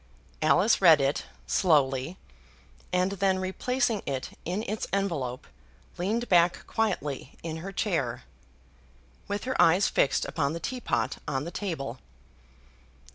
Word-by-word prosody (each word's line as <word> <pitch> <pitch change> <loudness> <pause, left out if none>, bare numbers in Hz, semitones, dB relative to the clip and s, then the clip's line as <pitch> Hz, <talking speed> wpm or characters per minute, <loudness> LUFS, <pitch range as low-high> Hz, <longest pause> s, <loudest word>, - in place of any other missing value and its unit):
Alice 215 +2 +4
read 165 -5 +8
it, 135 +1 0 0.2
slowly, 145 -2 +2 0.7
and 180 +1 +2
then 190 -1 +3
replacing 225 +4 0
it 135 -2 -3
in 185 +6 -2
its 215 +2 -3
envelope, 160 -11 -2 0.5
leaned 220 +7 -1
back 175 -2 +3
quietly 150 - -2
in 160 -1 -4
her 185 +5 -6
chair, 165 - -1 1.0
with 205 0 -3
her 260 +1 -2
eyes 180 +4 +5
fixed 140 - +2
upon 140 +2 -1
the 165 - -4
teapot 250 +6 -2
on 135 -1 -1
the 170 - -6
table. 135 - -4
175 Hz, 125 wpm, -28 LUFS, 145-200 Hz, 1.0 s, read